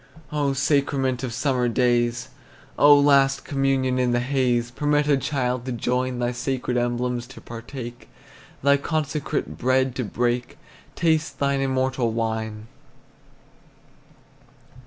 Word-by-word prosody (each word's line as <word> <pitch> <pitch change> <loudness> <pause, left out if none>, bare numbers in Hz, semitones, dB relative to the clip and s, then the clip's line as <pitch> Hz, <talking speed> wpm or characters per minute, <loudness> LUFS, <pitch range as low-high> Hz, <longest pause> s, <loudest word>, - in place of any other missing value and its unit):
Oh, 145 -2 0
sacrament 135 -2 +1
of 130 -2 -3
summer 125 0 0
days, 120 -1 +1 0.5
Oh, 145 0 +7
last 140 -1 +3
communion 135 -2 0
in 125 -1 +1
the 120 - +2
haze, 120 -2 0
Permit 145 +3 +1
a 145 - +4
child 130 -3 -1
to 130 - -3
join, 125 +1 -1
Thy 120 0 0
sacred 125 0 -2
emblems 120 0 -1
to 130 - -12
partake, 120 +1 -9 0.5
Thy 140 0 +5
consecrated 150 0 -3
bread 130 +1 +2
to 130 - -1
break, 120 +2 -2 0.4
Taste 160 -2 +1
thine 140 -1 0
immortal 130 -3 0
wine! 110 -1 -3
130 Hz, 120 wpm, -24 LUFS, 120-140 Hz, 0.5 s, Oh